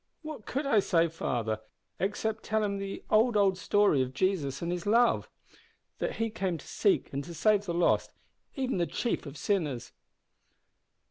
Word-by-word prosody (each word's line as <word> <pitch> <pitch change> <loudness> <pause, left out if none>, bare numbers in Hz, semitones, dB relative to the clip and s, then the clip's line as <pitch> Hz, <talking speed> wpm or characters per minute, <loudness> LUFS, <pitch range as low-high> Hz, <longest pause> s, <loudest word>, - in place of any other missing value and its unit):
"What 310 -8 -8
could 275 +3 -2
I 230 -6 +4
say, 170 -3 +2
father, 115 -9 -2 0.4
except 210 +3 -1
tell 220 0 0
him 200 -1 -1
the 195 0 -5
old, 220 +1 +4
old 195 -2 +4
story 200 -6 +3
of 130 0 -3
Jesus 145 -6 0
and 170 - -1
His 175 +2 -3
love; 235 +3 +3 0.7
that - - -2
He 225 -1 -1
came 190 -5 -2
to - - -13
seek 200 -8 +1
and 140 +1 -2
to 170 +2 -9
save 205 +4 +3
the 170 - -1
lost, 175 - +2 0.4
even 260 -6 -1
the 170 - +1
chief 235 -9 -2
of 140 +1 -8
sinners?" 150 - -1
195 Hz, 175 wpm, -30 LUFS, 165-215 Hz, 0.7 s, I